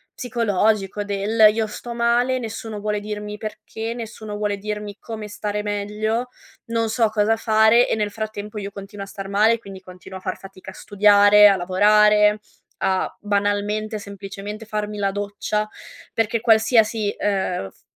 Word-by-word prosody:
psicologico, 215 -4 0
del: 205 +2 +4
io 220 0 -1
sto 235 +3 -7
male, 240 +2 +2
nessuno 225 -2 -6
vuole 210 0 -1
dirmi 210 0 -6
perché, 220 +1 -6
nessuno 220 -3 -7
vuole 205 -1 -1
dirmi 210 0 -5
come 220 -2 -7
stare 210 0 -4
meglio, 210 +3 -2 0.4
non 230 -1 -1
so 225 0 +2
cosa 215 +1 +2
fare, 220 +1 +4
e - - +1
nel 210 -1 -1
frattempo 215 0 -6
io 200 0 -6
continuo 200 0 -8
a - - -17
star 195 0 -7
male. 215 +4 +3
Quindi 195 -3 -11
continuo 185 0 -11
a - - -21
far 185 -1 -4
fatica 190 -1 -12
a - - -15
studiare, 205 0 +6
a 200 - +3
lavorare, 210 +3 +4 0.4
a 190 -1 0
banalmente 205 +1 -1
semplicemente 200 +1 -8
farmi 210 -1 -4
la 195 -1 +1
doccia, 205 +1 -2 0.5
perché 225 0 0
qualsiasi 220 -2 +3
ehm, 190 - -1
f - - -28
210 Hz, 155 wpm, -22 LUFS, 205-220 Hz, 0.5 s, studiare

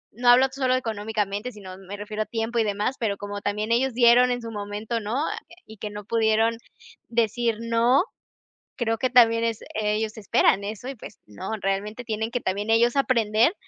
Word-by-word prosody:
no 245 +1 +2
hablo 250 +2 +7
solo 260 -1 +1
económicamente, 215 -2 -2
sino 195 -4 -10
me 195 +1 -9
refiero 210 +1 -3
a - - -16
tiempo 230 0 -2
y - - +4
demás, 210 +5 -1
pero 205 -4 -1
como 205 0 -6
también 210 +2 -2
ellos 250 +2 +2
dieron 245 +1 +6
en 245 - -2
su 230 - -6
momento, 210 +2 -4
¿no? 215 +2 -4 0.5
Y 220 - -13
que 210 - -5
no 205 0 -8
pudieron 225 +1 +2 0.5
decir 230 0 0
no, 230 +5 +3 0.7
creo 225 -2 -1
que 255 - +1
también 230 -2 +5
es 230 -2 -1
ellos 215 +1 -1
esperan 200 -1 +2
eso 215 +4 -6
y, 270 - -6
pues 215 - -12
no, 105 -1 -7
realmente 200 +4 -2
tienen 220 0 -3
que 245 - -1
también 205 +1 -2
ellos 235 +3 +3
aprender 235 - +3
225 Hz, 185 wpm, -25 LUFS, 210-240 Hz, 0.7 s, hablo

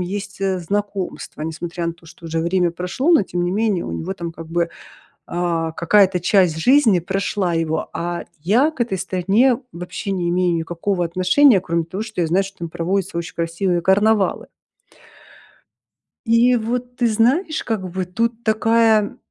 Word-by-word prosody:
есть, 195 +2 -5
э, 190 -1 0
знакомства, 200 -3 -4
несмотря 170 +2 -4
на 170 - -1
то, 170 -1 -21
что 165 +1 -13
уже 165 0 -1
время 175 +1 +1
прошло, 180 - -1
но 320 - +6
тем 175 -2 -3
не 175 - 0
менее 205 -2 0
у - - -5
него 165 - -4
там, 170 -2 -5
как 165 0 -10
бы, 170 +1 0 0.6
а, 170 -2 -1
какая-то 185 +3 +3
часть 180 -2 +3
жизни 230 - +4
прошла 195 0 -1
его. 160 -1 -1
А 175 0 -3 0.2
я 235 - +3
к 310 - -20
этой 230 -5 -1
стране 195 +7 +2 0.2
вообще 180 +3 -5
не 180 -3 -1
имею 175 0 +1
никакого 175 +3 -2
отношения, 185 +8 +4
кроме 170 -2 -1
того, 190 +5 -5
что 220 -5 -4
я 165 - +1
знаю, 185 +5 +2
что 195 0 -11
там 170 -1 -5
проводятся 175 +1 -2
очень 170 - -5
красивые 170 +1 -1
карнавалы. 205 +3 +2 1.8
И 235 +2 +4
вот, 245 +2 -3
ты 245 -1 +1
знаешь, 260 - +1
как 215 -5 -3
бы 185 +1 -3
тут 230 +5 -2
такая 220 -1 +2
185 Hz, 170 wpm, -20 LUFS, 170-220 Hz, 1.8 s, но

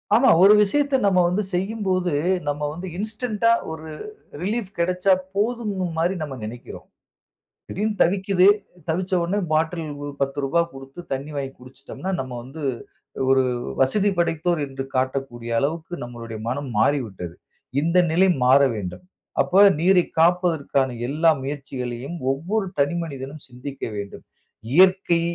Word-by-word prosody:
ஆமா. 255 +4 +5
ஒரு 200 +2 +9
விஷயத்த 280 +7 +2
நம்ம 190 -2 +4
வந்து 195 +4 0
செய்யும்போது 185 -1 0 0.4
நம்ம 145 0 -1
வந்து 175 +4 -7
இன்ஸ்டன்ட்‌டா 220 +2 0 0.2
ஒரு 160 0 -7 0.5
ரிலீஃப் 210 +1 -2
கெடைச்சா 180 +2 +3 0.2
போதும் 220 +1 0 0.2
மாரி 175 +4 +1
நம்ம 145 -3 -4
நெனைக்கிறோம். 115 +3 -8 0.8
திடீர்னு 210 +2 -1
தவிக்குது, 190 +1 +3 0.4
தவிச்ச 180 +4 -1
உடனே 190 +5 0
பாட்டில் 160 +2 +1 0.2
ரூ. 145 - -4
10 140 +4 +1
கொடுத்து 135 +3 -11
தண்ணி 135 +3 -5
வாங்கி 135 -1 -3
குடிச்சுட்டோம்னா, 135 +8 -7
நம்ம 130 -1 -4
வந்து 140 +5 -9 0.7
ஒரு 135 0 +5 0.4
வசதி 200 +10 +3
படைத்தோர் 170 0 +1
என்று 135 0 -5
காட்டக்கூடிய 130 -2 -2
அளவுக்கு 160 +5 -2
நம்மளுடைய 115 -2 -7
மனம் 135 +3 -3
மாறிவிட்டது. 105 - 0 0.5
இந்த 170 +4 +1
நிலை 185 +4 +4 0.2
மாறவேண்டும். 125 - +2 0.4
அப்ப 195 +3 +5 0.2
நீரை 180 +1 +4 0.2
காப்பதற்கான 165 -6 +2 0.2
எல்லா 155 +5 +3
முயற்சிகளையும் 135 +1 -5
ஒவ்வொரு 190 +9 -2
தனி 145 +4 +2
மனிதனும் 140 -1 -8
சிந்திக்க 130 +2 -9
வேண்டும். 100 -1 -7 0.5
இயற்கை, 185 -1 +5
160 Hz, 125 wpm, -23 LUFS, 135-185 Hz, 0.8 s, ஒரு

